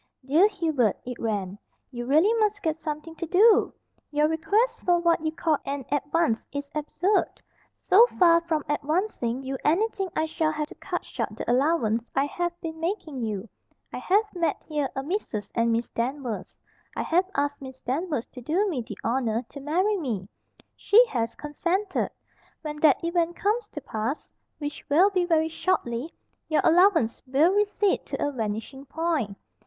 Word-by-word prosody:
"Dear 315 Hz, +9 st, +5 dB
Hubert," 315 Hz, -, 0 dB
it 250 Hz, -1 st, -6 dB
ran, 205 Hz, -3 st, -2 dB, 0.3 s
"you 240 Hz, -1 st, -5 dB
really 320 Hz, -, +4 dB
must 420 Hz, -2 st, +1 dB
get 320 Hz, -2 st, +1 dB
something 315 Hz, 0 st, -6 dB
to 335 Hz, -, -4 dB
do! 410 Hz, +6 st, +5 dB, 0.4 s
Your 300 Hz, 0 st, +2 dB
request 425 Hz, +10 st, +1 dB
for 355 Hz, -1 st, +4 dB
what 340 Hz, -2 st, +2 dB
you 315 Hz, -, 0 dB
call 315 Hz, -1 st, 0 dB
an 275 Hz, -2 st, -4 dB
advance 290 Hz, -3 st, +1 dB
is 285 Hz, 0 st, -5 dB
absurd. 335 Hz, +6 st, 0 dB, 0.4 s
So 450 Hz, +6 st, +7 dB
far 335 Hz, -2 st, +6 dB
from 320 Hz, -3 st, -1 dB
advancing 295 Hz, -, -1 dB
you 265 Hz, 0 st, -4 dB
anything 390 Hz, +4 st, +1 dB
I 315 Hz, -, +1 dB
shall 315 Hz, 0 st, 0 dB
have 305 Hz, -1 st, -2 dB
to -, -, -10 dB
cut -, -, -5 dB
short -, -, -4 dB
the -, -, -6 dB
allowance 245 Hz, -4 st, +1 dB
I 270 Hz, +1 st, +3 dB
have 345 Hz, +3 st, -3 dB
been 320 Hz, -1 st, -6 dB
making 325 Hz, -6 st, -3 dB
you. 215 Hz, -2 st, -3 dB, 0.5 s
I -, -, -4 dB
have 405 Hz, +4 st, +3 dB
met 335 Hz, -4 st, 0 dB
here 295 Hz, -4 st, -1 dB
a 270 Hz, -, -2 dB
Mrs. 270 Hz, -, -3 dB
and 230 Hz, 0 st, +2 dB
Miss 230 Hz, +1 st, -1 dB
Danvers. 245 Hz, -1 st, -3 dB, 0.4 s
I -, -, -1 dB
have 360 Hz, +3 st, +1 dB
asked 285 Hz, 0 st, -1 dB
Miss 265 Hz, -1 st, -9 dB
Danvers 290 Hz, -1 st, -2 dB
to 250 Hz, -, -10 dB
do 340 Hz, -, +1 dB
me 285 Hz, -9 st, -2 dB
the 225 Hz, -, -8 dB
honour 230 Hz, -1 st, 0 dB
to 285 Hz, -, -9 dB
marry 365 Hz, +9 st, +1 dB
me. 225 Hz, -, -3 dB, 0.5 s
She 465 Hz, +4 st, +5 dB
has 230 Hz, -3 st, -2 dB
consented. 360 Hz, +7 st, -1 dB, 0.5 s
When 300 Hz, -1 st, -5 dB
that 300 Hz, -1 st, +4 dB
event 340 Hz, 0 st, 0 dB
comes 425 Hz, +3 st, 0 dB
to 295 Hz, -, -7 dB
pass 225 Hz, +5 st, -4 dB, 0.3 s
which 290 Hz, -1 st, -6 dB
will 355 Hz, +8 st, +5 dB
be 365 Hz, -2 st, +1 dB
very 320 Hz, -2 st, +2 dB
shortly 310 Hz, -6 st, -1 dB, 0.4 s
your 310 Hz, -, +3 dB
allowance 335 Hz, -, +4 dB
will 295 Hz, +8 st, +4 dB
recede 410 Hz, -1 st, +1 dB
to -, -, -2 dB
a -, -, -2 dB
vanishing 225 Hz, +3 st, -4 dB
point. 300 Hz, -10 st, -2 dB
305 Hz, 170 wpm, -26 LUFS, 260-350 Hz, 0.5 s, So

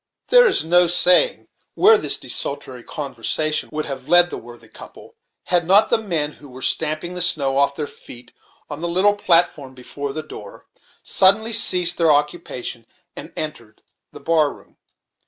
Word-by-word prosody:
There -, -, +6 dB
is -, -, +1 dB
no 175 Hz, +2 st, +3 dB
saying 180 Hz, -, +3 dB, 0.3 s
where 435 Hz, +4 st, +5 dB
this -, -, 0 dB
desultory -, -, -5 dB
conversation 155 Hz, -1 st, -4 dB
would 155 Hz, 0 st, -4 dB
have 135 Hz, -1 st, -7 dB
led 175 Hz, +1 st, +4 dB
the -, -, -6 dB
worthy 120 Hz, 0 st, -15 dB
couple, -, -, -14 dB, 0.3 s
had 175 Hz, -2 st, 0 dB
not 200 Hz, +4 st, +4 dB
the -, -, +3 dB
men, 165 Hz, -9 st, -1 dB
who 145 Hz, -1 st, -16 dB
were 130 Hz, +1 st, -9 dB
stamping 155 Hz, +3 st, -1 dB
the 180 Hz, -, -4 dB
snow 140 Hz, -6 st, +1 dB
off 140 Hz, 0 st, +1 dB
their 150 Hz, -, -4 dB
feet 120 Hz, -3 st, -14 dB, 0.3 s
on 150 Hz, 0 st, -9 dB
the 170 Hz, -, -2 dB
little 190 Hz, +4 st, +2 dB
platform 165 Hz, -8 st, 0 dB
before 140 Hz, +2 st, -7 dB
the 155 Hz, +2 st, -6 dB
door, 105 Hz, -9 st, -13 dB, 0.4 s
suddenly 215 Hz, +4 st, +3 dB
ceased 180 Hz, -6 st, +3 dB
their 165 Hz, -2 st, +3 dB
occupation, 145 Hz, -6 st, -3 dB, 0.3 s
and -, -, -9 dB
entered 120 Hz, -8 st, -7 dB, 0.3 s
the -, -, -12 dB
bar 155 Hz, -3 st, 0 dB
room. -, -, -19 dB
160 Hz, 165 wpm, -19 LUFS, 140-180 Hz, 0.4 s, There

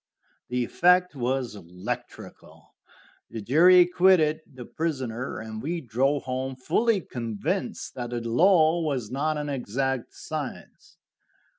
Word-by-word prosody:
The 125 Hz, 0 st, 0 dB
effect 180 Hz, +5 st, +3 dB
was 130 Hz, -1 st, -1 dB
electrical; 90 Hz, -2 st, -8 dB, 0.6 s
the 115 Hz, -, -6 dB
jury 165 Hz, -, +6 dB
acquitted 175 Hz, -3 st, +4 dB
the 130 Hz, -3 st, -10 dB
prisoner, 130 Hz, -7 st, -3 dB
and 110 Hz, 0 st, -7 dB
we 170 Hz, +6 st, -2 dB
drove 135 Hz, +2 st, 0 dB
home 130 Hz, 0 st, -3 dB
fully 215 Hz, -, +1 dB
convinced 115 Hz, -7 st, -4 dB
that 120 Hz, -2 st, -5 dB
the 120 Hz, 0 st, -3 dB
law 165 Hz, +5 st, +4 dB
was 135 Hz, -9 st, -2 dB
not 150 Hz, +4 st, -1 dB
an 150 Hz, 0 st, -3 dB
exact 135 Hz, 0 st, -2 dB
science. -, -, -7 dB
135 Hz, 120 wpm, -26 LUFS, 120-160 Hz, 0.6 s, jury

